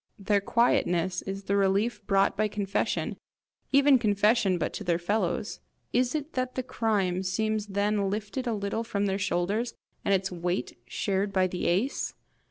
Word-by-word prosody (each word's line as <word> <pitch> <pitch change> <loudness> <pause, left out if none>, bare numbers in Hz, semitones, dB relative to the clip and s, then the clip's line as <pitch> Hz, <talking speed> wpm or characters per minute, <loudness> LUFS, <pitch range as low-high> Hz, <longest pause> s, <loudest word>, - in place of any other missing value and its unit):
Their 200 0 +1
quietness 185 -5 +2
is 195 +1 -5
the 200 +1 0
relief 200 +3 +1
brought 195 -1 +3
by 215 +1 +1
confession 205 -1 -1 0.5
even 275 -1 +6
confession 210 -2 +3
but - - -2
to - - -5
their 175 -3 +1
fellows. 175 - -1 0.3
Is 250 +3 +2
it 305 +1 -3
that 255 0 -2
the 255 - -1
crime 210 -7 0
seems 215 +3 -1
then 200 0 0
lifted 215 +5 -3
a 235 - +1
little 200 +2 -2
from 205 -3 -1
their 195 0 0
shoulders, 205 +6 -1 0.3
and - - 0
its 190 -1 +1
weight 175 -6 -2
shared 200 0 -1
by 190 -1 +3
the 180 -1 -2
ace? 200 +11 0
200 Hz, 165 wpm, -28 LUFS, 190-225 Hz, 0.5 s, even